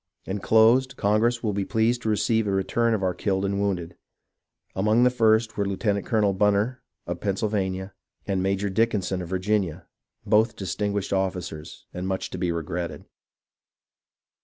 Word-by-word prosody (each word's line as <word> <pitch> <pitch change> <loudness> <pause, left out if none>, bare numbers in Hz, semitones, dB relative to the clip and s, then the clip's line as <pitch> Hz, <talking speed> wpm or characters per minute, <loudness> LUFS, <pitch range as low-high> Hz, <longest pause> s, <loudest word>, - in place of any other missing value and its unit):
Enclosed, 115 +6 +3
Congress 115 +4 +1
will 105 -2 0
be 100 0 -1
pleased 115 +4 +1
to 110 - -2
receive 110 +1 +1
a - - 0
return 115 +4 +1
of 100 - -3
our 90 -1 +1
killed 95 0 -1
and 100 0 -1
wounded. 90 -4 -2 0.8
Among 110 +5 +3
the 125 - +5
first 115 -2 +2
were 100 -1 0
Lieutenant 100 0 -1
colonel 105 -4 +2
Bunner 105 +5 +1 0.2
of - - -4
Pennsylvania, 95 -1 -2 0.3
and 95 -2 -1
Major 100 +1 0
Dickinson 95 -3 0
of 85 - -7
Virginia, 95 -2 -1 0.2
— - - -47
both 110 +2 +3
distinguished 100 +2 -2
officers, 90 -5 -3
and 90 +1 -4
much 95 0 -3
to - - -5
be 90 -2 0
regretted. 85 +1 -4
100 Hz, 155 wpm, -25 LUFS, 95-110 Hz, 0.8 s, the